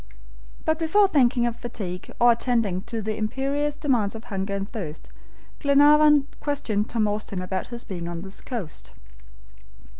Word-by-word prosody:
But 315 0 +1
before 395 +5 +4
thinking 250 -7 +3
of 235 -1 -2
fatigue, 190 -7 -6
or 240 0 +7
attending 230 -6 0
to 225 -2 -4
the 215 +1 -2
imperious 275 +6 -1
demands 240 -9 0
of 225 - -8
hunger 195 -1 -3
and 195 0 -3
thirst, 165 -9 -6 0.5
Glenarvan 295 0 +6
questioned 220 -8 -1
Tom 220 -2 +1
Austin 205 -2 -3
about 185 +1 -3
his 240 -1 -6
being 175 -3 -6
on 170 0 -5
this 195 0 -7
coast. 220 - -7
230 Hz, 150 wpm, -25 LUFS, 200-280 Hz, 0.5 s, or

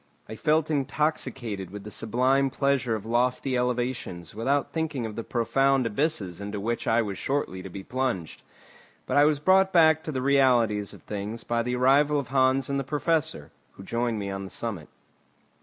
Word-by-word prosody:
I 110 - -7
felt 155 +5 +1
intoxicated 130 - -1
with 100 +1 -8
the 105 - -8
sublime 130 +6 +1
pleasure 135 -4 0
of 110 - -6
lofty 125 +3 0
elevations 125 -8 -2
without 135 +6 -1
thinking 155 -7 -2
of 110 -2 -6
the 115 - -4
profound 135 +3 +1
abysses 110 - -1
into 100 0 -4
which 115 +4 -3
I 115 +1 +3
was 100 -3 -5
shortly 135 -9 -2
to 95 - -8
be 95 +2 -8
plunged. 125 -11 -3 0.6
But - - 0
I 145 - +7
was 150 -1 +3
brought 190 +4 +4
back 160 -2 +5
to 155 - -3
the 130 -3 -3
realities 120 -7 +2
of - - -17
things 105 +3 -5
by 120 0 0
the 125 +1 -2
arrival 140 +4 +4
of 135 - -6
Hans 130 0 +2
and 140 0 -1
the - - -2
Professor, 155 +3 -1 0.2
who 95 - -12
joined 115 +2 -1
me 100 -1 -4
on 95 0 -4
the 95 - -8
summit. 100 -10 -4
125 Hz, 185 wpm, -26 LUFS, 110-140 Hz, 0.6 s, I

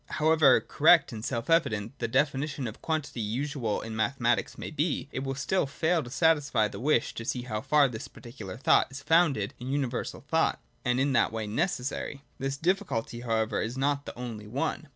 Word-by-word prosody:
However 155 -3 +5
correct 160 0 +4
and 110 -2 -7
self 115 -2 -3
evident 135 -8 +1
the 115 - -1
definition 140 +2 0
of 110 - -9
quantity 155 -7 -2
usual 120 +1 -2
in 110 0 -6
Mathematics 120 +1 0
may - - -6
be, - - -1
it 130 - -4
will 135 0 -3
still 140 +4 0
fail 160 +4 +1
to 120 - -8
satisfy 140 -6 +2
the 105 - -8
wish 135 -3 +1
to 115 - -6
see 125 +1 -2
how 110 -4 -3
far 150 +2 +4
this 110 -4 -6
particular 110 -5 -9
thought 130 - +4
is 140 +1 -9
founded 150 - +3
in 125 +2 -5
universal 135 -1 -2
thought, 160 +1 +1 0.2
and 125 -2 +1
in 135 +1 +2
that - - +3
way 110 -1 -3
necessary. 140 - -2 0.2
This 135 +1 -2
difficulty, 165 - -1
how 115 -2 -1
ever, 110 0 0
is 115 +4 -3
not 140 +1 0
the - - -7
only 115 -4 -6
one. 140 +6 -3
135 Hz, 195 wpm, -28 LUFS, 115-150 Hz, 0.2 s, However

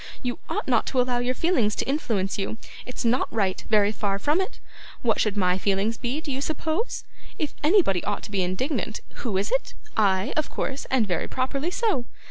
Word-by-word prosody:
You 245 -1 -2
ought - - -2
not 240 -4 +3
to 260 - +1
allow 245 -1 +2
your 250 +1 0
feelings 250 - +2
to - - -1
influence 220 -10 0
you; 200 +3 -2 0.3
it's 250 - -4
not 240 +3 +2
right, 195 -4 0
very 210 -2 +5
far 200 -2 0
from 295 - +2
it. 380 - -4 0.4
What 225 -3 +3
should 210 -1 +1
my 180 -1 +3
feelings 200 +3 +1
be, 250 +4 -2
do 300 - -4
you 265 +1 -2
suppose? 315 - -1 0.3
If 305 -4 -2
anybody 300 - +4
ought 205 -1 -2
to - - -8
be 195 -2 +1
indignant, 185 - -1 0.2
who 220 -7 0
is 195 - 0
it? - - 0 0.2
I, 195 -2 +3
of 310 - 0
course, 270 0 -3
and 260 -4 +3
very 175 -4 -1
properly 275 +5 -1
so. 365 - +1
240 Hz, 200 wpm, -26 LUFS, 200-280 Hz, 0.4 s, very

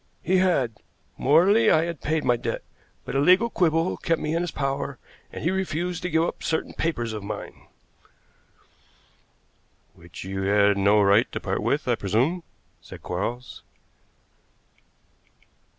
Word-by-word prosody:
"He 185 +3 +2
had. 140 - +1 0.4
Morally, 195 - +4
I 155 - +4
had 170 -3 -6
paid 155 +1 -1
my 125 -1 +3
debt, 115 - -4 0.4
but - - -5
a 135 - +1
legal 185 +10 +4
quibble 165 0 +1
kept 165 -2 0
me 155 - -2
in 170 - 0
his 175 - -2
power, 140 -2 -3 0.3
and - - -7
he 170 - +1
refused 180 -2 -2
to 180 - -3
give 160 0 +2
up - - -3
certain 160 - -2
papers 120 -9 -2
of 105 - -5
mine." 105 - -8 2.3
"Which 85 0 -11
you 95 +1 -4
had 100 +1 +3
no 100 +1 +4
right 100 +3 +3
to - - -4
part - - -2
with, - - -1
I - - +3
presume," 125 - 0 0.4
said - - -12
Quarles. 120 +8 -4
150 Hz, 150 wpm, -25 LUFS, 110-175 Hz, 2.3 s, Morally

